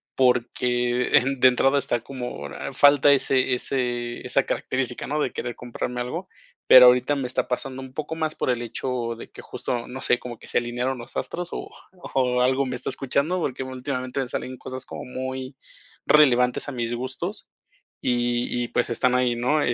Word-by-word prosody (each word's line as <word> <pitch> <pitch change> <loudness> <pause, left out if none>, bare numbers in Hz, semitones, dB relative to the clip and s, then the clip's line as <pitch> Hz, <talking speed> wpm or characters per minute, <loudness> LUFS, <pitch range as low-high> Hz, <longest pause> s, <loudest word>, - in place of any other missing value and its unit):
porque 125 -1 +2 0.2
de 130 - +7
entrada 135 +3 +3
está 120 -2 0
como 125 - -6 0.2
falta 145 0 +6
ese 130 -1 +2
ese 120 -2 -2
esa 135 +2 +2
característica 130 -2 -2
no 150 +2 -1
de 130 - -1
querer 120 -1 -4
comprarme 125 0 -4
algo. 170 +10 -5 0.4
Pero, 125 -1 +10
ahorita 125 +4 +4
me 130 -2 -2
está 125 - -1
pasando 130 +1 -3
un 130 -1 -10
poco 155 +2 -4
más 155 -1 -1
por - - -2
el 120 -1 +1
hecho 120 0 -3
de - - -10
que - - -11
justo, 120 -1 -4
no 130 +1 -6
sé, 125 - +2
como 120 -2 -8
que - - -14
se - - +1
alinearon 120 +2 -2
los 120 - -9
astros 175 0 -3
o - - -5 0.5
o 125 -1 +2
algo 130 +2 +2
me 125 -1 -3
está 125 - -4
escuchando, 140 +7 0
porque, 130 -2 -2
últimamente 130 0 -3
me 130 - -3
salen 130 +1 -5
cosas 130 +1 -5
como - - -7
muy 130 +1 -5 0.5
relevantes 125 -3 +4
a - - -5
mis 120 -1 -2
gustos 130 +2 -5 0.5
y 120 0 0
y - - -5
pues, 120 - 0
están 125 +2 +2
ahí, 125 -2 +1
¿no? 145 +6 +1
125 Hz, 180 wpm, -24 LUFS, 120-135 Hz, 0.5 s, Pero